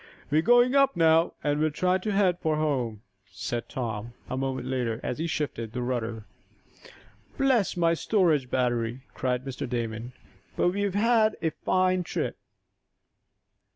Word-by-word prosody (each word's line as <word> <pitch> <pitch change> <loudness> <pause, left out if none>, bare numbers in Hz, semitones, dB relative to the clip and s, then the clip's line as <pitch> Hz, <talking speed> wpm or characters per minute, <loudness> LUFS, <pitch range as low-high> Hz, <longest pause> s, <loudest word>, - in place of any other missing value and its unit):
"We're 155 +2 +4
going 245 +5 +5
up 275 -1 +4
now, 165 0 +4
and 145 0 +1
will 155 +1 +2
try 180 +4 +1
to 210 +3 -2
head 195 -3 +2
for 160 -3 0
home," 125 -8 -1 0.3
said 120 -1 -4
Tom, 115 -2 -4 0.2
a - - -1
moment 130 -1 -2
later, 125 -3 -1
as 125 - -3
he 165 - -1
shifted 115 -8 -3
the 125 0 -2
rudder. 115 -3 -3 1.1
"Bless 260 -9 +2
my 170 -1 +3
storage 165 - +2
battery!" 120 -1 0
cried 125 0 -1
Mr. 130 -2 -5
Damon. 120 0 -3 0.4
"But - - +3
we 200 +3 -2
have 200 -2 -1
had 220 0 +3
a 160 - +1
fine 185 +2 +1
trip." 175 - -3
150 Hz, 155 wpm, -27 LUFS, 125-185 Hz, 1.1 s, going